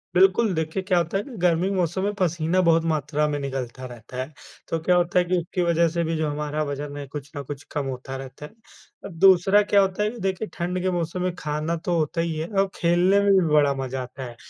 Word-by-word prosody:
बिल्कुल, 190 +3 +4
देखिए 160 +3 -2
क्या 185 -1 +1
होता 175 +3 0
है 200 - -2
ना 260 - -11
गर्मी 175 0 +2
के - - -1
मौसम 180 +1 0
में 205 +1 0
पसीना 175 0 +1
बहुत 165 0 +4
मात्रा 150 0 0
में 145 - -1
निकलता 130 -2 -5
रहता 120 0 -10
है, 130 +4 -4 0.3
तो 165 - -1
क्या 180 +1 +3
होता 175 +1 +2
है 180 - +1
कि 180 +1 +1
उसकी 175 +1 -2
वज़ह 170 0 +3
से 170 +1 -1
भी 165 0 -1
जो 155 -1 0
हमारा 150 +1 -2
वज़न 145 0 -5
है 140 - -5
कुछ 140 0 -8
ना 145 - -3
कुछ 145 +1 -7
कम 145 -2 -2
होता 135 0 -5
रहता 135 +2 -9
है। - - -12 0.5
और - - -6
दूसरा 190 +3 +5
क्या 200 0 +4
होता 195 +1 0
है 210 - +1
कि 240 - -10
देखिए 190 +2 -2
ठंड 180 +1 -2
के 185 +1 0
मौसम 175 0 -2
में 180 0 -1
खाना 150 +2 -2
तो 170 +1 -1
होता 160 +1 0
ही 165 -1 -2
है, 160 +1 -3
औ 195 -2 +2
खेलने 175 +4 +3
में 200 0 +3
भी 190 -2 +4
बड़ा 145 -2 +4
मज़ा 130 0 -4
आता 130 +2 -8
है। 120 -2 -8
165 Hz, 250 wpm, -24 LUFS, 145-185 Hz, 0.5 s, दूसरा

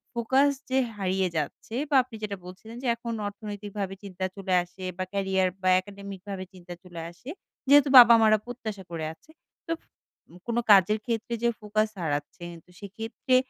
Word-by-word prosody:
Focus 265 +5 +3 0.2
যে 265 - +3 0.2
হারিয়ে 190 -1 0
যাচ্ছে 155 +9 -4
বা 285 - +1
আপনি 250 -3 -12
যেটা 200 -2 -3
বলছিলেন 210 +6 -11
যে - - -1
এখন 235 0 -5
অর্থনৈতিক 205 0 -7
ভাবে 195 -1 -3
চিন্তা 185 -1 -4
চলে 190 -2 -3
আসে 180 +2 -13
বা 185 - -1
ক্যারিয়ার 190 -1 +1
বা 185 - +3
একাডেমিক 200 -1 -10
ভাবে 190 -1 -4
চিন্তা 175 -1 -10
চলে 170 -2 -8
আসে। 245 +10 -12 0.4
যেহেতু 285 -1 +7
বাবা 235 -1 +11
মা 220 - +6
রা 215 - +4
প্রত্যাশা 220 -5 -6
করে 160 -2 -3
আছে। 310 - -22 0.4
তো - - -3 0.8
কোন 235 0 -1
কাজের 205 +2 +6
ক্ষেত্রে 230 0 -2
যে 235 - +4
ফোকাস 215 +1 0
হারাচ্ছে 150 +3 -3 0.4
সেক্ষেত্রে 225 +5 -2
200 Hz, 170 wpm, -27 LUFS, 185-230 Hz, 0.8 s, বাবা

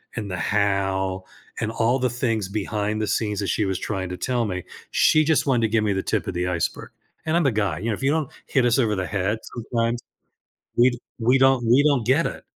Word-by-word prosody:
and 105 -3 -4
the 90 - -3
how, 95 0 0 0.4
and 110 0 -1
all 115 +2 +1
the 125 - +1
things 115 -5 -1
behind 105 +1 -2
the 110 - -1
scenes 105 -2 -1
that 100 - -2
she 105 - 0
was 95 -1 -2
trying 95 -3 -3
to 90 - -5
tell 120 -3 0
me, 90 -3 -3 0.3
she 155 - +4
just 155 -1 +2
wanted 125 -4 +3
to 115 - +3
give 110 0 +2
me 105 -2 +1
the 95 - -2
tip - - -1
of - - -2
the 90 +1 -1
iceberg. 85 -2 -2 0.3
And 160 +1 0
I'm 175 - +4
the 135 - +3
guy, 100 -7 -1
you 110 - -4
know, - - +1
if 135 - -9
you 135 - +3
don't 155 -3 0 0.2
hit 130 -2 +1
us 120 -1 +3
over 110 -5 +2
the 95 -1 -2
head 105 +1 -1
sometimes, 120 0 -2 0.8
we 120 +2 +6
d 120 - -6 0.2
we 120 +3 +3
don't 135 -2 +4
we 125 +5 +5
don't 140 -7 +2
get 140 +6 +3
it. - - -6
110 Hz, 245 wpm, -23 LUFS, 100-125 Hz, 0.8 s, we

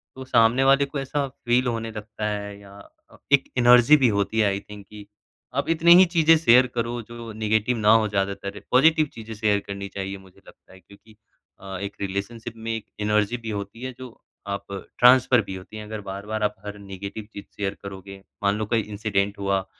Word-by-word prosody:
तो 130 0 -8
सामने 120 0 +3
वाले 135 +1 +4
को 140 0 -5
ऐसा 140 +1 -2
फ़ील 125 -1 0
होने 115 -1 -3
लगता 105 0 -7
है 100 -1 -5
या 100 -1 -15 0.6
एक 140 - +6
एनर्जी 125 +4 +7
भी - - +7
होती 100 +2 0
है 105 - +4
आई 100 0 -1
थिंक 105 -1 -10
कि 105 -1 -12 0.5
आप - - -3
इतनी 165 +1 +6
ही 185 +1 +8
चीज़ें 165 0 +6
शेयर 125 -4 +5
करो 120 0 -2
जो 115 -1 -8
नेगेटिव 110 +2 0
ना 105 -1 +4
हो 110 -1 +4
ज़्यादातर। 100 0 -3
पॉजिटिव 155 +4 +5
चीज़ें 110 0 -9
शेयर 105 -1 +1
करनी 100 0 -5
चाहिए 95 0 -4
मुझे 95 - -20
लगता - - -18
है। 95 - -15
क्योंकि 100 +4 -20 0.4
अ, 95 0 -7
एक 100 0 -5
रिलेशनशिप 100 +4 -4
में 115 0 -5
एक 110 -2 -7 0.2
एनर्जी 105 +2 +1
भी 115 -1 -8
होती 100 +4 -9
है 130 0 -5
जो 125 -3 -11 0.3
आप 100 0 -5 0.3
ट्रांसफ़र 125 0 +6
भी 95 -2 -7
होती 95 +3 -10
हैं। 105 - -7
अगर 110 0 -6
बार-बार 105 +3 -4
आप 105 0 0
हर 105 0 -6
नेगेटिव 100 +2 -8
चीज़ 100 - -9
शेयर 100 -1 -2
करोगे, 100 0 -9 0.3
मान 100 +1 +2
लो 110 - -2
कोई 115 +1 +1
इंसिडेंट 100 -1 -2
हुआ, 100 -1 0
110 Hz, 200 wpm, -24 LUFS, 100-120 Hz, 0.6 s, ही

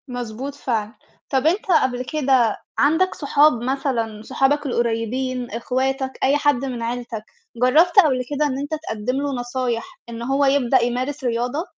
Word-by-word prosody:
مضبوط 245 +2 -5
فعلًا. 225 -5 -3 0.3
طب 270 +2 +1
أنت 360 +6 +1
قبل 255 -5 +2
كده 260 -7 +2 0.2
عندك 320 +6 +2
صحاب 295 +1 +4
مثلًا 245 -5 -2
صحابك 280 +6 +1
القريّبين، 245 +1 -1
اخواتك، 260 +4 -1
أي 280 +2 +4
حد 290 -3 +1
من 250 -3 -4
عيلتك، 235 -2 -4 0.3
جرّبت 305 - +5
قبل 260 -4 +1
كده 295 +1 0
إن 270 -3 -1
أنت 285 +2 -5 0.2
تقدّم 220 +4 -2
له 285 0 -1
نصايح 245 -1 -3
إن 230 0 -7
هو 270 +4 +1
يبدأ 270 -2 +3
يمارس 255 +4 -2
رياضة؟ 245 +5 -1
255 Hz, 150 wpm, -21 LUFS, 240-285 Hz, 0.3 s, جرّبت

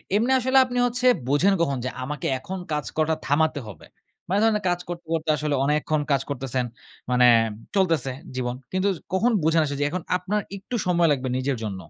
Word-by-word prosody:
এমনি 235 +5 +2
আসলে 260 +2 +2
আপনি 250 0 -4
হচ্ছে 245 +1 -2 0.2
বোঝেন 165 +8 +3
কখন 140 -5 +1
যে, - - 0
"আমাকে 145 +1 -4
এখন 190 +8 -6
কাজ 150 -1 -1
করাটা 160 0 +1
থামাতে 155 +1 +2
হবে?" 95 -7 -11 0.4
মানে 195 +3 +1
ধরেন 225 -1 +4
না - - -7
কাজ 175 0 0
করতে, 175 -1 -6
করতে 160 -1 -2
আসলে 150 -1 -1
অনেকক্ষণ 150 +1 +1
কাজ 135 -1 +3
করতেছেন, 130 -2 -2 0.4
মানে 120 -2 +5 0.3
চলতেছে, 165 -9 +2 0.2
জীবন। 125 -1 -2 0.2
কিন্তু 190 +1 +1 0.2
কখন 230 +6 +3
বুঝেন 160 0 +3
আস 145 - -4
যে - - +1 0.3
আপনার 205 +3 -2 0.2
একটু 220 +5 -6
সময় 170 -2 +3
লাগবে 130 -2 -1
নিজের 130 -1 -1
জন্য? 100 -3 -3
155 Hz, 185 wpm, -24 LUFS, 135-190 Hz, 0.4 s, মানে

